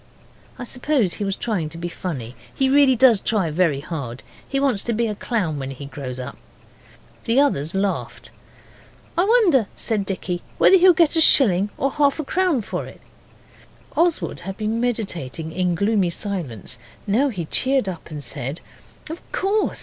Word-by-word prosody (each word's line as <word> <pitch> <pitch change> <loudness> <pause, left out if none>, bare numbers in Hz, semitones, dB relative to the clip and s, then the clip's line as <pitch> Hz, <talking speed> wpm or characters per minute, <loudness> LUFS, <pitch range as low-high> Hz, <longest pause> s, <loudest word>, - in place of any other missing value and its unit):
I 250 - -6
suppose 250 - 0
he - - -4
was 195 -1 -1
trying 190 -10 -2
to 165 - -10
be 170 +1 -4
funny 140 -10 -5 0.2
he 265 -1 +2
really 280 -2 +5
does 240 -3 +5
try 195 -8 0
very 155 -4 +1
hard. 140 -6 -6 0.3
He 275 - 0
wants 270 -8 +2
to 235 - 0
be 230 +2 +1
a 215 - -1
clown 195 -8 -2
when 135 0 -4
he 135 +1 -8
grows 135 -3 -7
up. 125 - -7 0.9
The 230 +4 +3
others 175 - +1
laughed. 195 0 -2 0.8
'I 350 - +3
wonder,' 385 - +4
said 205 -4 -1
Dicky, 180 -2 -3 0.2
'whether - - +6
he'll 365 0 +7
get 330 -1 +3
a 325 - +3
shilling 205 - +5
or 275 - 0
half 285 -1 +2
a 310 - -2
crown 355 -3 +1
for - - -4
it.' - - -14 0.9
Oswald 340 -1 +1
had 195 +1 -7
been 220 +1 -1
meditating 175 - -3
in 180 0 0
gloomy 200 0 +2
silence, 150 - -5 0.3
now 230 +8 +2
he 185 -9 -4
cheered 260 - +1
up 175 -3 -6
and 150 -2 -7
said 130 +5 -4 0.5
'Of 320 +2 -7
course! 405 +2 0
200 Hz, 175 wpm, -22 LUFS, 165-265 Hz, 0.9 s, he'll